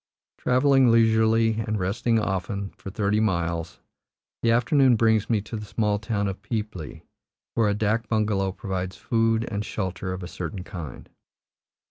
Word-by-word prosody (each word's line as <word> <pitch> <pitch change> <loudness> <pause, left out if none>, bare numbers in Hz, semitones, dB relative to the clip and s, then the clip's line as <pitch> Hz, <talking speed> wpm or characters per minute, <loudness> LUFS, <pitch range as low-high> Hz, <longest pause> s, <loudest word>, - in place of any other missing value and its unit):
Travelling 130 0 +4
leisurely, 115 0 +4
and 110 -1 -1
resting 115 +5 +1
often, 100 -1 -2
for - - -10
thirty 105 +2 0
miles, 85 -5 -1 0.6
the 115 - +2
afternoon 125 +2 +4
brings 110 -1 +2
me 110 -3 +2
to 105 +3 -7
the 105 -1 -5
small 105 -1 0
town 105 -1 -1
of 95 0 -5
Peepli, 100 -7 -5 0.5
where 110 -2 +2
a 100 - +1
dak 110 +1 0
bungalow 105 -3 +1
provides 95 -2 -4
food 115 -1 +1
and 105 0 -2
shelter 95 -3 -4
of 95 0 -5
a - - -5
certain 90 +1 -5
kind. 85 -9 -8
105 Hz, 150 wpm, -25 LUFS, 95-115 Hz, 0.6 s, Travelling